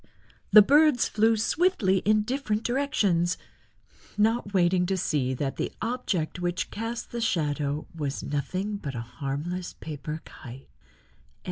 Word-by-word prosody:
the 215 - +9
birds 290 0 +4
flew 220 +1 +2
swiftly 220 - +2
in 215 +2 +2
different 225 -3 -2
directions, 205 -10 +1 0.8
not 220 0 +1
waiting 180 -1 +2
to 190 0 0
see 140 -7 0
that 135 +1 -3
the - - -2
object 215 -9 -2
which 175 0 -2
cast 230 +2 -5
the 235 - -3
shadow 150 -7 -1
was 145 -3 -3
nothing 185 +9 -2
but 140 -8 -6
a 115 - -3
harmless 140 +9 -4
paper 150 0 -6
kite. 130 -1 -11
185 Hz, 130 wpm, -27 LUFS, 150-225 Hz, 0.8 s, the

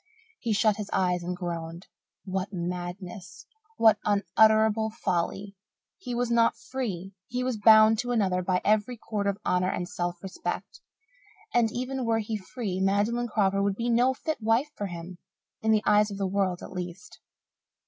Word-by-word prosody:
He 235 - -2
shut 215 0 +3
his 210 -2 -5
eyes 180 -1 +1
and 180 +1 -4
groaned. 170 0 -5 0.4
What 190 0 -3
madness. 180 +1 -6 0.3
What 220 -2 +5
unutterable 220 +1 +3
folly! 195 -1 -2 0.4
He 245 -10 -5
was 240 0 -1
not 230 -1 +4
free 195 -8 -5
he 250 +1 -2
was 255 -3 -1
bound 220 0 +7
to 245 - -2
another 190 -6 +1
by 180 0 0
every 215 +3 +2
cord 210 -2 -3
of 200 -1 0
honour 180 0 +2
and 180 -1 -3
self 175 -1 -3
respect. 190 -1 -5 0.7
And, 230 -2 +3
even 255 +2 -3
were 230 -1 +1
he 220 0 -2
free, 205 -1 -4
Magdalen 205 +5 +1
Crawford 195 -3 +1
would 200 -1 +1
be 235 +3 -2
no 250 +3 +3
fit 315 -1 -4
wife 230 +7 +1
for 205 - -3
him 175 0 -8 0.4
in 220 - -1
the 215 -1 +4
eyes 210 0 +4
of 200 - -6
the 195 - -1
world, 190 -2 -1
at - - -9
least. 180 - -7
205 Hz, 170 wpm, -27 LUFS, 185-225 Hz, 0.7 s, bound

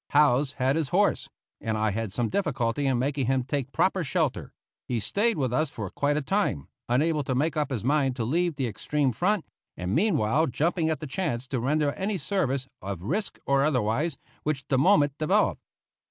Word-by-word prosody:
Howze 145 -1 +4
had 135 +2 +1
his 155 -4 -1
horse, - - +2 0.3
and 110 -1 -2
I 110 0 +1
had 110 0 -3
some 115 +3 0
difficulty 135 - 0
in 130 -2 +2
making 135 0 0
him 130 -1 +2
take 135 0 -3
proper 190 +3 +1
shelter; 140 - -1 0.4
he 120 - -1
stayed 210 - +1
with 130 -4 0
us 155 +5 +1
for 100 -5 -6
quite 145 +1 0
a 150 - -1
time, 140 - 0 0.2
unable 150 +4 +2
to 130 -1 -1
make 155 +5 +1
up 150 -2 0
his 125 -6 -3
mind 135 -1 +2
to 120 - -2
leave 170 +6 +1
the 135 -2 -1
extreme 135 +5 0
front, 180 - 0 0.3
and 90 +2 -2
meanwhile 155 - +2
jumping 160 +5 0
at 160 - -2
the - - -4
chance 135 -5 -2
to 130 - -1
render 145 +4 +1
any 195 +5 -2
service, 140 -6 -1
of 95 -3 -5
risk 190 - -2
or 140 0 +3
otherwise, 135 +2 0 0.2
which 145 -3 -2
the 135 -3 +3
moment 145 -4 +4
developed. 190 +7 +2
140 Hz, 195 wpm, -27 LUFS, 125-160 Hz, 0.4 s, Howze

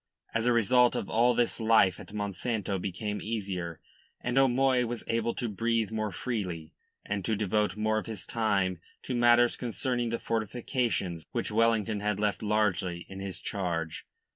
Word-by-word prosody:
As 115 +1 +1
a - - +5
result 120 +2 +4
of - - -3
all 120 +2 +4
this 120 0 +1
life 110 -4 +4
at - - -11
Monsanto 100 0 -2
became 105 +3 -3
easier, 95 -7 -3 0.4
and 125 0 -2
O'Moy 130 -1 +4
was 120 0 -4
able 115 0 0
to 120 - -2
breathe 115 +1 0
more 110 -2 -2
freely, 90 -8 -4 0.3
and 100 -1 -2
to 110 - 0
devote 105 +1 0
more 110 0 +1
of - - -8
his 110 -4 -6
time 100 -6 0 0.2
to 130 - -3
matters 120 0 +5
concerning 120 0 -2
the 115 - -1
fortifications 115 - -1
which - - -1
Wellington 110 -1 +2
had 105 -1 -1
left 105 -1 0
largely 95 -5 0
in 95 0 -8
his 95 -1 -5
charge. 85 -5 -3
110 Hz, 165 wpm, -29 LUFS, 100-115 Hz, 0.4 s, a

